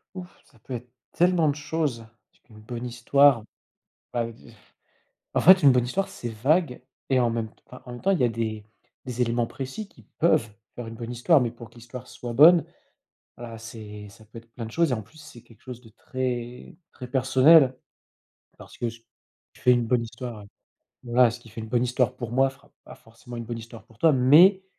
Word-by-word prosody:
Ouf, 180 -1 -8 0.2
ça 115 - -25
peut 130 - -9
être 120 0 -7 0.2
tellement 175 -2 +3
de 140 - -1
choses 145 -6 -3 0.4
une 110 -1 -15
bonne 120 +2 -7
histoire, 125 +1 +3 0.7
bah, 120 -1 -1
v 115 - -9 0.2
heu, - - -15 0.8
en - - +2
fait, 185 -1 +7
une 135 - +8
bonne 125 -1 +2
histoire, 195 +11 -2
c'est 120 - -7
vague 130 +6 0 0.3
et 130 -1 +2
en 120 - +3
même 115 -1 -2
t - - -32
ah, 125 - -12
en 125 - -9
même 120 - -9
temps, 195 - +2
il 185 - 0
y 125 - +4
a - - +3
des 110 -2 -4 0.4
des 125 -1 -6
éléments 120 -1 +1
précis 135 +11 -7
qui - - -20 0.2
peuvent 155 -8 +2 0.3
faire 120 - -6
une 115 - -8
bonne 115 +1 -7
histoire 135 +6 +3
mais 120 - 0
pour 115 -1 -13
que - - -25
l'histoire 120 +1 -10
soit 120 -1 -8
bonne, 165 +5 +7 0.7
voilà, 115 -1 -8
c'est 105 -2 -10
ça 110 +1 -18
peut 110 - -17
être 115 0 -16
plein 115 -2 -7
de 110 - -9
choses 165 +2 +1
et - - +2
en 110 - -4
plus, 115 +10 -22
c'est 150 -6 -13
quelque 115 -2 -22
chose 125 -2 -9
de 115 - -17
très, 125 0 -5 0.2
très 125 - -9
personnel. 130 +2 +5 0.8
Parce - - -14
que 120 - -2
ce 115 +1 -12
qui 115 - -38 0.6
fait 125 - +5
une 120 -1 +2
bonne 120 0 +1
histoire, 115 -2 -8 0.6
voilà, 120 0 +4
ce 120 - -8
qui 120 - -17
fait 115 - -8
une 110 - -8
bonne 120 +1 +1
histoire 125 0 0
pour 120 -3 -6
moi 135 +2 +3
fera 135 - -22
pas - - -13
forcément 120 +2 -13
une 115 - -5
bonne 115 0 -6
histoire 115 0 -11
pour 115 - -23
toi, 160 +5 +4
mais 160 +9 +6
120 Hz, 220 wpm, -25 LUFS, 115-135 Hz, 0.8 s, une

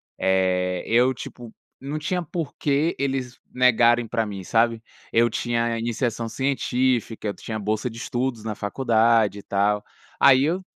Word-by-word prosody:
Eh, 90 -1 +1
eu, 125 +3 +3
tipo, 120 -2 -9 0.3
não 140 +3 -4
tinha 180 +4 -2
por 165 -1 -5
que 145 +3 0
eles 135 -2 -2
negarem 120 -1 +4
pra 115 -1 -1
mim, 100 -2 -6
sabe. 115 +3 +1 0.3
Eu 115 +1 +4
tinha 120 -1 -1
iniciação 115 0 -2
científica, 125 -3 -1
eu - - -3
tinha 110 +1 -6
bolsa 110 +3 -2
de 115 - -11
estudos 120 -1 -3
na 110 -1 -3
faculdade 110 -1 +2
e - - -9
tal. 105 +1 0 0.4
Aí 135 -1 +6
eu 175 +6 0
120 Hz, 150 wpm, -24 LUFS, 110-130 Hz, 0.4 s, Aí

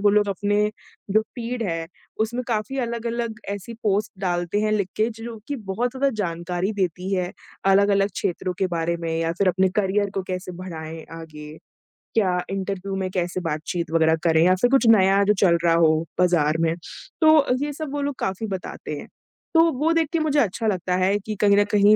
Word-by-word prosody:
वो 205 - +4
लोग 205 0 +3
अपने 205 +2 +1 0.4
जो 215 +2 +4
फ़ीड 240 0 -3
हैं, 165 -4 -2 0.3
उसमें 240 +3 0
काफ़ी 235 +4 -2
अलग-अलग 235 -2 -2
ऐसी 200 +3 -5
पोस्ट 210 0 +1
डालते 175 +1 0
हैं 215 0 +1
लिख 200 -3 0
के 220 +2 +2
जि 225 0 -11
जो 235 -1 -6
कि 285 - -2 0.2
बहुत 240 +5 -1
थोड़ा 275 +1 +2
जानकारी 175 +2 -2
देती 185 -1 -2
है 180 -1 -1 0.4
अलग-अलग 200 0 +4
क्षेत्रों 185 -1 -2
के 190 - +2
बारे 170 +1 0
में 165 -1 -3
या 165 0 0
फिर 200 - +3
अपने 185 +1 +3
करियर 200 0 +1
को 195 - -1
कैसे 185 0 -4
बढ़ाएँ 160 -3 -7 0.2
आगे। 150 -1 -10 0.6
क्या 185 -5 +2
इंटरव्यू 195 0 -3
में 190 -1 -2
कैसे 180 -1 -1
बातचीत 160 +2 -3
वगैरह 160 -1 +4
करें 160 -1 +4
या 185 +1 +5
फिर 245 - +4
कुछ 260 -3 +4
नया 195 +1 +4
जो 210 +1 +4
चल 170 -3 +5
रहा 165 - +5
हो 160 -1 +4 0.2
बाज़ार 165 -4 +3
में, 165 0 +1 0.5
तो 315 0 +7
अ, 280 -4 +3
ये 290 0 -2
सब 305 -1 -5
वो 290 - -2
लोग 285 -1 -2
काफ़ी 195 +3 -2
बताते 185 -5 -5
हैं। - - -10 0.5
तो 325 - +6 0.2
वो 310 +4 +2
देख 330 -1 +2
के 330 - +2
मुझे 300 -2 +2
अच्छा 225 -1 0
लगता 185 -3 0
है 190 +2 +2
कि 215 +1 -5
कहीं 200 -1 +5
न 205 - +6
कहीं 210 0 +6
195 Hz, 200 wpm, -23 LUFS, 175-220 Hz, 0.6 s, तो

